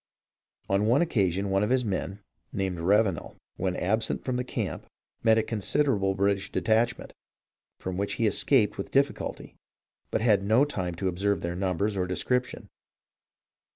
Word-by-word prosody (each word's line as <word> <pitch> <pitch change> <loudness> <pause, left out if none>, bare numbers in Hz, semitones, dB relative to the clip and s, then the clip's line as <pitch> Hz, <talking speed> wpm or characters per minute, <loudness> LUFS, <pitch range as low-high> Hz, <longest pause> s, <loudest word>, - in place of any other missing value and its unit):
On 100 +2 +1
one 130 +8 +4
occasion 100 - 0
one 95 0 +2
of 105 - +1
his 125 -1 +2
men 100 0 -3 0.3
(named 95 -3 -2
Ravenel), 95 0 +1 0.2
when 90 -1 -1
absent 110 +5 0
from 130 - -1
the 125 - -1
camp, 125 - -4 0.3
met 110 -1 +4
a 110 - +3
con 110 -1 -3
siderable 100 -5 +1
British 100 0 0
detachment, 115 +2 0 0.6
from 90 -1 -5
which 100 +1 -1
he 115 - 0
escaped 105 0 +2
with - - -4
difficulty, 140 +1 -1 0.6
but - - -1
had 110 -4 +4
no 110 +7 +4
time 90 -11 -3
to 95 +3 -2
observe 100 +3 0
their 85 0 -3
numbers 95 +3 -1
or 90 -1 -1
description. 125 +7 -1
100 Hz, 155 wpm, -27 LUFS, 95-115 Hz, 0.6 s, one